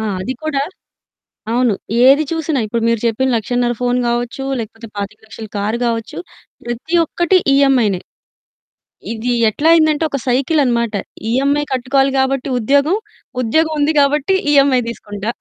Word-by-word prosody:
ఆ! -, -, -3 dB, 0.2 s
అది 250 Hz, +7 st, -3 dB
కూడా 285 Hz, -3 st, -1 dB, 0.9 s
అవును. 245 Hz, -2 st, +2 dB, 0.3 s
ఏది 275 Hz, +4 st, +6 dB
చూసినా 320 Hz, -3 st, -1 dB
ఇప్పుడు 230 Hz, +2 st, -2 dB
మీరు 230 Hz, -2 st, +1 dB
చెప్పిన 260 Hz, +4 st, 0 dB
1,50,000 240 Hz, +2 st, 0 dB
ఫోను 245 Hz, 0 st, 0 dB
గావచ్చు 240 Hz, +3 st, -2 dB
లేకపోతే 225 Hz, +1 st, -7 dB
25,00,000ల 215 Hz, +2 st, -7 dB
కారు 215 Hz, +3 st, -1 dB
గావచ్చు. 230 Hz, -1 st, -3 dB, 0.5 s
ప్రతి 240 Hz, +8 st, -5 dB
ఒక్కటి 345 Hz, +4 st, +1 dB, 0.2 s
ఈఎంఐనే 255 Hz, -9 st, +3 dB, 1.1 s
ఇది 230 Hz, +2 st, -2 dB, 0.2 s
ఎట్లా 290 Hz, +9 st, -1 dB
అయిందంటే 315 Hz, -1 st, +3 dB
ఒక 280 Hz, -, -2 dB
సైకిల్ 275 Hz, +5 st, +1 dB
అన్నమాట. 235 Hz, -3 st, 0 dB, 0.4 s
ఈఎంఐ 280 Hz, +3 st, +1 dB
కట్టుకోవాలి 270 Hz, +2 st, +1 dB
గాబట్టి 265 Hz, +1 st, 0 dB
ఉద్యోగం. 285 Hz, -, +2 dB, 0.5 s
ఉద్యోగం 315 Hz, +7 st, +1 dB
ఉంది 300 Hz, +2 st, +2 dB
గాబట్టి 295 Hz, +6 st, +2 dB, 0.2 s
ఈఎంఐ 275 Hz, -3 st, +4 dB
తీసుకుంటా. 205 Hz, -1 st, -5 dB
255 Hz, 130 wpm, -17 LUFS, 230-285 Hz, 1.1 s, ఏది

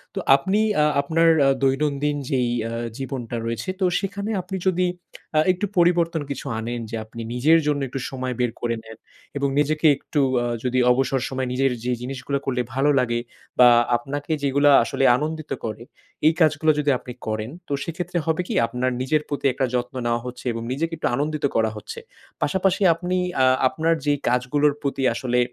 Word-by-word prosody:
তো -, -, -1 dB, 0.2 s
আপনি 190 Hz, +9 st, 0 dB, 0.2 s
আ 150 Hz, -, +4 dB, 0.2 s
আপনার 165 Hz, +3 st, +3 dB, 0.2 s
আ -, -, +5 dB
দৈনন্দিন 145 Hz, +2 st, +1 dB
যেই 125 Hz, -3 st, +1 dB, 0.2 s
আ -, -, -6 dB, 0.3 s
জীবনটা 130 Hz, -3 st, -5 dB
রয়েছে। 115 Hz, +10 st, -3 dB
তো, 190 Hz, -, +2 dB
সেখানে 200 Hz, +1 st, -4 dB
আপনি 185 Hz, +2 st, -6 dB
যদি 185 Hz, 0 st, +2 dB, 0.5 s
আ -, -, +6 dB
একটু 185 Hz, +3 st, -2 dB
পরিবর্তন 170 Hz, -2 st, +3 dB
কিছু 140 Hz, -, -5 dB
আনেন। 120 Hz, +2 st, -4 dB
যে 115 Hz, -, -4 dB
আপনি 115 Hz, +1 st, -9 dB
নিজের 155 Hz, +7 st, +4 dB
জন্য 145 Hz, -1 st, +1 dB
একটু 135 Hz, -, -4 dB
সময় 130 Hz, -1 st, -4 dB
বের 125 Hz, -2 st, +1 dB
করে 120 Hz, -1 st, 0 dB
নেন 110 Hz, 0 st, -12 dB, 0.4 s
এবং 140 Hz, 0 st, +1 dB
নিজেকে 155 Hz, +2 st, +2 dB
একটু 150 Hz, -, -3 dB, 0.2 s
আ -, -, -1 dB, 0.2 s
যদি 130 Hz, 0 st, +1 dB
অবসর 130 Hz, 0 st, +1 dB
সময় 130 Hz, -1 st, -2 dB
নিজের 135 Hz, 0 st, +2 dB
যে 125 Hz, -, -1 dB
জিনিসগুলো 135 Hz, +2 st, -3 dB
করলে 125 Hz, -2 st, 0 dB
ভালো 135 Hz, +3 st, +2 dB
লাগে। 120 Hz, -2 st, 0 dB, 0.4 s
বা 125 Hz, -, +9 dB, 0.3 s
আপনাকে 145 Hz, +5 st, -6 dB
যেগুলা 140 Hz, +1 st, +2 dB, 0.2 s
আসলে 135 Hz, -, -2 dB
আনন্দিত 155 Hz, +2 st, -4 dB
করে। 110 Hz, +1 st, -5 dB, 0.4 s
এই 160 Hz, -, +5 dB
কাজগুলো 155 Hz, 0 st, +4 dB
যদি 150 Hz, 0 st, +1 dB
আপনি 125 Hz, -, -9 dB
করেন। 110 Hz, +1 st, -2 dB, 0.2 s
তো -, -, -10 dB
সেক্ষেত্রে 175 Hz, +1 st, -4 dB
হবে 160 Hz, +2 st, +1 dB
কি? -, -, -3 dB
আপনার 125 Hz, +2 st, -1 dB
নিজের 150 Hz, +4 st, +1 dB
প্রতি 145 Hz, -1 st, -4 dB
একটা 130 Hz, -, 0 dB
যত্ন 125 Hz, +2 st, -2 dB
নেওয়া 120 Hz, 0 st, 0 dB
হচ্ছে 125 Hz, +1 st, -8 dB
এবং 115 Hz, 0 st, -5 dB
নিজেকে 165 Hz, +5 st, -2 dB
একটু -, -, -1 dB
আনন্দিত 150 Hz, +2 st, -1 dB
করা 110 Hz, -1 st, +2 dB
হচ্ছে। 285 Hz, -, -8 dB, 0.4 s
পাশাপাশি 190 Hz, 0 st, +1 dB
আপনি 180 Hz, +2 st, -3 dB, 0.3 s
আ -, -, +6 dB, 0.2 s
আপনার 165 Hz, +5 st, +1 dB
যে 145 Hz, -, +3 dB, 0.2 s
কাজগুলোর 135 Hz, +4 st, +2 dB
প্রতি 140 Hz, -1 st, -2 dB
আসলে 125 Hz, +1 st, 0 dB
140 Hz, 180 wpm, -23 LUFS, 125-160 Hz, 0.5 s, বা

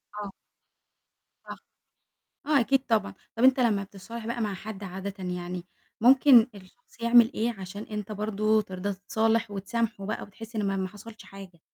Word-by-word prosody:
آه. 205 Hz, -2 st, -5 dB, 1.1 s
صح. -, -, -8 dB, 0.9 s
آه، 295 Hz, -2 st, +4 dB
أكيد 270 Hz, +3 st, +3 dB
طبعًا. 220 Hz, -3 st, +1 dB, 0.2 s
طَب 230 Hz, -, -1 dB
أنت 260 Hz, 0 st, +6 dB
لمّا 215 Hz, -5 st, +2 dB
بتتصالح 210 Hz, +4 st, -9 dB
بقى 235 Hz, 0 st, -2 dB
مع 210 Hz, -3 st, -1 dB
حد 200 Hz, +1 st, -8 dB
عادةً 190 Hz, +1 st, -6 dB
يعني، 180 Hz, 0 st, -4 dB, 0.4 s
ممكن 255 Hz, -1 st, +7 dB
الشخص 200 Hz, +5 st, -18 dB
يعمل 235 Hz, +1 st, +6 dB
إيه 230 Hz, +2 st, -1 dB
عشان 190 Hz, +3 st, -7 dB
أنت 210 Hz, -1 st, -6 dB
برضه 215 Hz, +1 st, +1 dB
ترضى 190 Hz, 0 st, -4 dB
تتصالح 220 Hz, +3 st, 0 dB
وتسامحه 210 Hz, +1 st, -2 dB
بقى 215 Hz, -, -3 dB
وتحس 225 Hz, +3 st, -11 dB
إن 210 Hz, -2 st, 0 dB
ما 195 Hz, -, 0 dB
ما 190 Hz, -1 st, -1 dB
حصلش 215 Hz, +3 st, -12 dB
حاجة؟ 190 Hz, -4 st, -12 dB
210 Hz, 160 wpm, -27 LUFS, 195-230 Hz, 1.1 s, ممكن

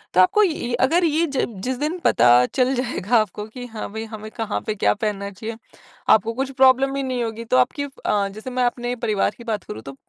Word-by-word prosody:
तो -, -, +5 dB
आपको 420 Hz, -, +4 dB
ये 310 Hz, -10 st, -1 dB
अगर 345 Hz, +6 st, +2 dB
ये 320 Hz, +1 st, +2 dB
ज 265 Hz, -, +1 dB, 0.2 s
जिस 255 Hz, 0 st, -1 dB
दिन 305 Hz, +5 st, -1 dB
पता 120 Hz, -, +4 dB, 0.3 s
चल 255 Hz, 0 st, +2 dB
जाएगा 245 Hz, -3 st, 0 dB
आपको 210 Hz, -1 st, -1 dB
कि 245 Hz, +3 st, -9 dB
हाँ, 220 Hz, -2 st, -6 dB
भई 220 Hz, 0 st, -4 dB
हमें 215 Hz, -1 st, -8 dB
कहाँ 220 Hz, -3 st, -3 dB
पे 215 Hz, -, -1 dB
क्या 210 Hz, -, +2 dB
पहनना 205 Hz, -2 st, -3 dB
चाहिए। 220 Hz, +3 st, -7 dB, 0.5 s
आपको 220 Hz, +2 st, +4 dB
कुछ 265 Hz, +3 st, -3 dB
प्रॉब्लम 265 Hz, +1 st, +4 dB
ही 275 Hz, -, -1 dB
नहीं 255 Hz, -2 st, -2 dB
होगी 230 Hz, 0 st, -5 dB
तो 130 Hz, -, +2 dB
आपकी 130 Hz, -, +2 dB
अ, 210 Hz, -7 st, -1 dB
जैसे 215 Hz, +6 st, -8 dB
मैं 250 Hz, 0 st, 0 dB
अपने 245 Hz, 0 st, -2 dB
परिवार 210 Hz, -3 st, +1 dB
की 235 Hz, -, -11 dB
बात 215 Hz, -4 st, -2 dB
करूँ 110 Hz, -, -7 dB
तो, 135 Hz, +2 st, -9 dB
230 Hz, 225 wpm, -22 LUFS, 215-260 Hz, 0.5 s, तो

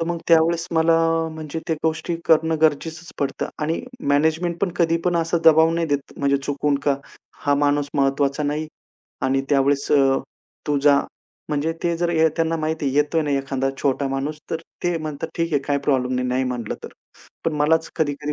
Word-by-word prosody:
तर 165 Hz, -, 0 dB
मग 170 Hz, -1 st, -2 dB
त्यावेळेस 165 Hz, +1 st, +4 dB
मला 165 Hz, 0 st, +4 dB, 0.3 s
अ, -, -, -3 dB
म्हणजे 160 Hz, 0 st, -6 dB
त्या 160 Hz, -, +2 dB
गोष्टी 160 Hz, +1 st, -1 dB
करणं 160 Hz, 0 st, +3 dB
गरजेचंच 160 Hz, +2 st, 0 dB
पडतं 140 Hz, -, -2 dB
आणि 160 Hz, +2 st, -1 dB, 0.3 s
मॅनेजमेंट 160 Hz, +4 st, +1 dB
पण 195 Hz, -3 st, +1 dB
कधी 165 Hz, -1 st, +2 dB
पण 175 Hz, -1 st, +2 dB
असा 165 Hz, +1 st, +1 dB
दबाव 160 Hz, 0 st, +6 dB
नाही 170 Hz, -1 st, 0 dB
देत 145 Hz, -1 st, -2 dB
म्हणजे 140 Hz, 0 st, +2 dB
चुकून 145 Hz, +1 st, -1 dB
का 140 Hz, -1 st, +3 dB, 0.5 s
हा 145 Hz, 0 st, +3 dB
माणूस 145 Hz, 0 st, +1 dB
महत्वाचा 140 Hz, +1 st, +1 dB
नाही 150 Hz, +2 st, -1 dB, 0.6 s
आणि 135 Hz, +1 st, +2 dB
त्यावेळेस 140 Hz, 0 st, +2 dB
अ, 135 Hz, -2 st, +4 dB, 0.5 s
तू 145 Hz, -1 st, +1 dB
जा. 140 Hz, -1 st, +5 dB, 0.5 s
म्हणजे 150 Hz, +2 st, 0 dB
ते 170 Hz, -1 st, 0 dB
जर 170 Hz, 0 st, 0 dB
ये 160 Hz, -1 st, +4 dB
त्यांना 165 Hz, 0 st, +1 dB
माहिती 155 Hz, -2 st, -1 dB
येतोय 150 Hz, +2 st, +2 dB
ना 145 Hz, -, -2 dB
एखादा 135 Hz, -1 st, -1 dB
छोटा 140 Hz, 0 st, 0 dB
माणूस 140 Hz, +3 st, -3 dB
तर -, -, 0 dB, 0.3 s
ते 175 Hz, -1 st, +1 dB
म्हणतात, 155 Hz, 0 st, -5 dB
"ठीक 165 Hz, -1 st, -1 dB
आहे, 145 Hz, -, +2 dB
काही 140 Hz, 0 st, 0 dB
प्रॉब्लेम 130 Hz, -3 st, +1 dB
नाही 125 Hz, 0 st, -1 dB
नाही 130 Hz, +1 st, 0 dB
म्हणलं 125 Hz, -3 st, -3 dB
तर." -, -, -5 dB, 0.6 s
पण 165 Hz, -, +1 dB
मलाच 160 Hz, +2 st, +2 dB
कधी-कधी 150 Hz, -1 st, -1 dB
150 Hz, 185 wpm, -22 LUFS, 140-165 Hz, 0.6 s, दबाव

